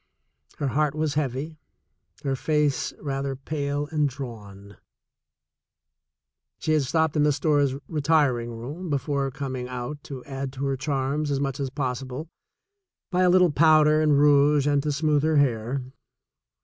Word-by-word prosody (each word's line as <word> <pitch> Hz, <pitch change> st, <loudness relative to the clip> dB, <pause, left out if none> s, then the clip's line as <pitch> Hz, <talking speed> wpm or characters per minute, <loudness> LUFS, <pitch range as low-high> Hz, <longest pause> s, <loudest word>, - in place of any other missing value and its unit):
Her 140 Hz, -, -1 dB
heart 150 Hz, +2 st, 0 dB
was 155 Hz, -1 st, -1 dB
heavy, 145 Hz, +2 st, -3 dB, 0.6 s
her 135 Hz, -1 st, 0 dB
face 150 Hz, -1 st, 0 dB
rather 135 Hz, -1 st, -3 dB
pale 145 Hz, +1 st, -3 dB
and 150 Hz, -2 st, +1 dB
drawn. 105 Hz, -7 st, -9 dB, 1.8 s
She 155 Hz, -, -2 dB
had 155 Hz, -, +3 dB
stopped 160 Hz, +3 st, 0 dB
in 150 Hz, -, +3 dB
the 150 Hz, 0 st, +4 dB
store's 145 Hz, -1 st, +1 dB
retiring 145 Hz, -6 st, +1 dB
room 140 Hz, +10 st, -7 dB
before 140 Hz, -1 st, -1 dB
coming 130 Hz, -2 st, -5 dB
out 125 Hz, +3 st, -5 dB
to 130 Hz, -3 st, -8 dB
add 135 Hz, -1 st, -5 dB
to 135 Hz, +1 st, -4 dB
her 135 Hz, 0 st, 0 dB
charms 140 Hz, +2 st, -1 dB
as 140 Hz, -1 st, 0 dB
much 135 Hz, -1 st, -2 dB
as 135 Hz, -1 st, -2 dB
possible 130 Hz, +2 st, -4 dB, 0.8 s
by 180 Hz, 0 st, +2 dB
a 180 Hz, -, +5 dB
little 180 Hz, -2 st, +5 dB
powder 155 Hz, 0 st, +5 dB
and 150 Hz, -2 st, +4 dB
rouge 145 Hz, 0 st, +4 dB
and 145 Hz, -1 st, +2 dB
to 150 Hz, +1 st, -1 dB
smooth 150 Hz, 0 st, +1 dB
her 155 Hz, 0 st, +2 dB
hair. 125 Hz, -1 st, +1 dB
140 Hz, 150 wpm, -25 LUFS, 135-150 Hz, 1.8 s, a